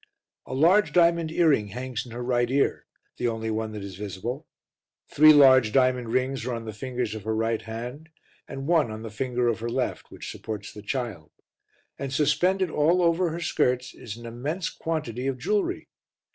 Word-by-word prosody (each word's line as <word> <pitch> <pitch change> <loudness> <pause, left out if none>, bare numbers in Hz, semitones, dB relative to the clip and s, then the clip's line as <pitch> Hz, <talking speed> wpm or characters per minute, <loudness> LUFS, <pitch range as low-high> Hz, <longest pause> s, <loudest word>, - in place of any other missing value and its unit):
A 130 - -4
large 180 +9 +4
diamond 170 -2 +3
earring 155 -11 +3
hangs 125 +2 -5
in - - -11
her 120 +2 -5
right 120 -1 +1
ear, 140 +2 0 0.3
the 125 - 0
only 110 -1 -2
one 110 0 -2
that 105 -2 -6
is 95 -2 -8
visible; 105 - -5 0.6
three 155 +1 +7
large 130 -6 +7
diamond 125 -2 +2
rings 130 0 0
are 125 0 -2
on 115 -1 -6
the 110 - -6
fingers 125 0 -3
of 110 - -6
her 110 +1 -1
right 115 0 0
hand 120 +8 -7 0.4
and 135 0 -6
one 160 -6 +3
on 110 +1 -7
the 110 - -7
finger 125 +2 -1
of 115 -1 0
her 115 +1 -3
left 125 +2 -2
which - - -8
supports 105 -1 -7
the 105 - -9
Child, 110 - -4 0.7
and 135 -1 -4
suspended 160 +6 +2
all 170 +5 +3
over 170 +1 +2
her 165 +2 -4
skirts 125 -6 0
is 115 -2 -8
an 120 - -11
immense 145 +10 -3
quantity 150 -6 -3
of 135 -1 -1
jewellery. 205 +11 -1
125 Hz, 185 wpm, -26 LUFS, 115-150 Hz, 0.7 s, three